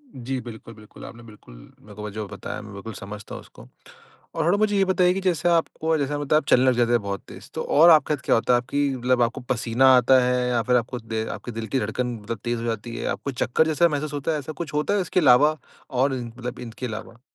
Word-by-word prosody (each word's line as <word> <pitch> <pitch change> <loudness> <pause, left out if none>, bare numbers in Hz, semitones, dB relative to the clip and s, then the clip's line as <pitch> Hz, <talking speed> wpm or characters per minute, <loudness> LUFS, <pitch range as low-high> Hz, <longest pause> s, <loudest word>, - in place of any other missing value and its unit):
जी, 130 +1 -4
बिल्कुल, 115 -1 -10
बिल्कुल। 105 -1 -13
आपने 120 +1 -11
बिल्कुल 105 - -15 0.3
मेरे 105 - -14
को 105 +1 -6
जो 110 +1 -5
बताया 100 0 -7
मैं 105 -1 -11
बिल्कुल 105 +3 -8
समझता 100 +1 -9
हूँ - - -8
उसको। - - -16 0.7
और 165 +4 +2
मुझे 215 -1 +2
ये 195 - +3
बताइए 180 -1 +3
कि 195 - -3
जैसे 175 -2 +1
आपको 160 -1 +1
जैसे 145 -1 -2
आपने 145 0 -2
बताया 150 +2 +3
आप 155 - -1
चलने 125 +1 +5
लग 130 - +4
जाते 120 0 +2
हैं 120 -2 +3
बहुत 100 -1 -4
तेज़, - - -12
तो - - -3
और 165 +4 +5
आपके 155 -2 +5
साथ 140 - -15
क्या - - +4
होता 120 +2 +2
है - - +5
आपकी 140 +4 -1
मतलब 125 0 +1
आपको 120 0 0
पसीना 120 +2 +2
आता 130 +1 +5
है? 125 0 +1
या 120 -2 +1
फिर 125 +1 +2
आपको 125 +1 -1
दे 110 0 -4
आपके 120 - -8
दिल 110 0 -5
की 135 - 0
धड़कन 110 +3 -2
मतलब 110 +2 -5
तेज़ 120 -1 -2
हो 115 - -5
जाती 115 0 -4
है? - - -4
आपको 105 +8 -3
चक्कर 125 +5 +1
जैसा 165 +2 +3
महसूस 150 0 -3
होता 145 +3 -2
है? 155 - -1
ऐसा 145 +2 -7
कुछ 150 -3 -11
होता 150 +7 0
है 205 - +2
इसके 185 0 0
अलावा 150 +1 +5 0.3
और 135 +2 +1
मतलब 120 +1 -7
इनके 120 +1 -7
अलावा? 115 +1 -7
125 Hz, 255 wpm, -24 LUFS, 115-150 Hz, 0.7 s, चलने